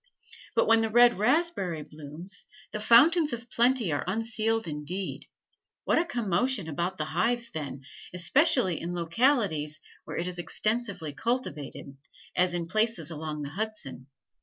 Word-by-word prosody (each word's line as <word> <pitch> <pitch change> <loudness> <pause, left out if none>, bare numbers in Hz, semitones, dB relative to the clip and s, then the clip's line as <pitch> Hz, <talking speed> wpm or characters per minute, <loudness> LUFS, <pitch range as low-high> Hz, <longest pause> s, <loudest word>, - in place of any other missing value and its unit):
But - - +4
when 225 0 +5
the 225 - 0
red 240 -1 +5
raspberry 215 - +1
blooms, 155 +6 -7 0.2
the 210 - -4
fountains 295 +8 +5
of 235 +1 -7
plenty 240 -5 +2
are 145 - -1
unsealed 225 +1 -1
indeed; 160 +6 -5 0.6
what - - +3
a 340 - +1
commotion 235 - 0
about 170 +4 -2
the 150 - -2
hives 235 +9 +1
then, 140 -3 -6 0.3
especially 185 - +2
in 175 +1 -4
localities 170 - +1 0.3
where - - -6
it 170 - -2
is 180 -1 -5
extensively 200 -5 -1
cultivated, 150 - -4 0.4
as 180 -1 +2
in 170 -1 -2
places 215 -3 0
along 155 -1 -5
the 140 - -5
Hudson. 205 - -5
190 Hz, 140 wpm, -28 LUFS, 160-235 Hz, 0.6 s, when